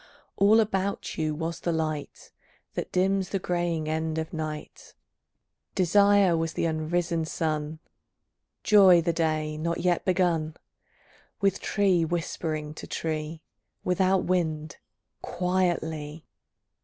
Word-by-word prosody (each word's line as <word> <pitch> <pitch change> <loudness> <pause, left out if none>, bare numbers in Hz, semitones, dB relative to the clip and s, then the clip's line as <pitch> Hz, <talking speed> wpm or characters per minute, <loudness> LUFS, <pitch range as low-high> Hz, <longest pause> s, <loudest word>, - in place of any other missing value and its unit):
All 210 +3 +5
about 200 -2 -1
you 155 -1 0
was 165 +2 -4
the 170 - -1
light 155 -2 -4 0.4
That - - -4
dims 190 +1 +1
the 195 - -1
greying 175 -3 -1
end 160 0 -2
of 160 0 -4
night; 155 -1 -6 0.8
Desire 200 0 +4
was 165 0 -1
the - - -1
unrisen 165 +1 -1
sun, 155 -1 -2 0.9
Joy 190 -5 +7
the 170 0 +1
day 155 -2 -1
not 170 +1 -2
yet 175 -1 +1
begun, 170 -4 +1 0.8
With 195 -1 +1
tree 190 -4 +2
whispering 160 -2 -3
to - - -9
tree, 155 0 -4 0.4
Without 185 +1 +2
wind, 155 -4 -1 0.4
quietly. 165 -4 -2
165 Hz, 115 wpm, -27 LUFS, 155-185 Hz, 0.9 s, Joy